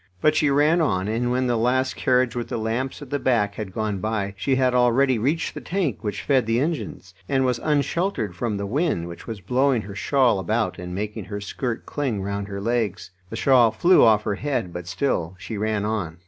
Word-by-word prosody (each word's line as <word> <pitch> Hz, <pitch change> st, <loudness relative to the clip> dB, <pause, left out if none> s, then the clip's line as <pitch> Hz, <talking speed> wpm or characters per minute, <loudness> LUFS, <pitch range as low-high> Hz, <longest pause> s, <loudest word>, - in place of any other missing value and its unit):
But 155 Hz, -, +3 dB
she 150 Hz, -1 st, +3 dB
ran 150 Hz, +5 st, +3 dB
on, 95 Hz, -10 st, 0 dB
and 115 Hz, +3 st, 0 dB
when 130 Hz, +1 st, +1 dB
the 120 Hz, -1 st, +1 dB
last 130 Hz, +3 st, +1 dB
carriage 125 Hz, -2 st, +2 dB
with 120 Hz, -1 st, -3 dB
the -, -, -2 dB
lamps 120 Hz, +6 st, -3 dB
at 135 Hz, -, -13 dB
the 145 Hz, -, 0 dB
back 110 Hz, -7 st, +1 dB
had 105 Hz, -3 st, -6 dB
gone 105 Hz, -1 st, -2 dB
by, 105 Hz, -1 st, -2 dB
she 130 Hz, +7 st, 0 dB
had 130 Hz, -1 st, +2 dB
already 125 Hz, 0 st, +3 dB
reached 145 Hz, +9 st, 0 dB
the -, -, -7 dB
tank 170 Hz, -, -2 dB
which 105 Hz, -2 st, -3 dB
fed 130 Hz, -5 st, +2 dB
the 115 Hz, +1 st, +2 dB
engines, 140 Hz, -, -3 dB, 0.2 s
and 135 Hz, -1 st, +2 dB
was 125 Hz, -2 st, 0 dB
unsheltered 145 Hz, -, 0 dB
from 110 Hz, 0 st, -2 dB
the 100 Hz, -, -3 dB
wind, 110 Hz, -, 0 dB
which 85 Hz, 0 st, -10 dB
was 110 Hz, -3 st, -6 dB
blowing 125 Hz, +3 st, +1 dB
her 100 Hz, +1 st, -8 dB
shawl 125 Hz, 0 st, +2 dB
about 95 Hz, -, -1 dB
and 90 Hz, 0 st, -6 dB
making 105 Hz, +1 st, -4 dB
her 100 Hz, +3 st, -5 dB
skirt 115 Hz, +3 st, -4 dB
cling 125 Hz, -9 st, -2 dB
round 100 Hz, 0 st, -3 dB
her 100 Hz, -1 st, -5 dB
legs. 110 Hz, -4 st, -2 dB, 0.2 s
The -, -, -6 dB
shawl 125 Hz, -4 st, +5 dB
flew 175 Hz, +12 st, +4 dB
off 110 Hz, -2 st, +5 dB
her 105 Hz, -, -1 dB
head, 120 Hz, -6 st, -2 dB
but 90 Hz, 0 st, -6 dB
still 90 Hz, -3 st, -1 dB
she 110 Hz, -, -6 dB
ran 105 Hz, 0 st, -1 dB
on. 100 Hz, -7 st, -2 dB
115 Hz, 215 wpm, -23 LUFS, 100-130 Hz, 0.2 s, shawl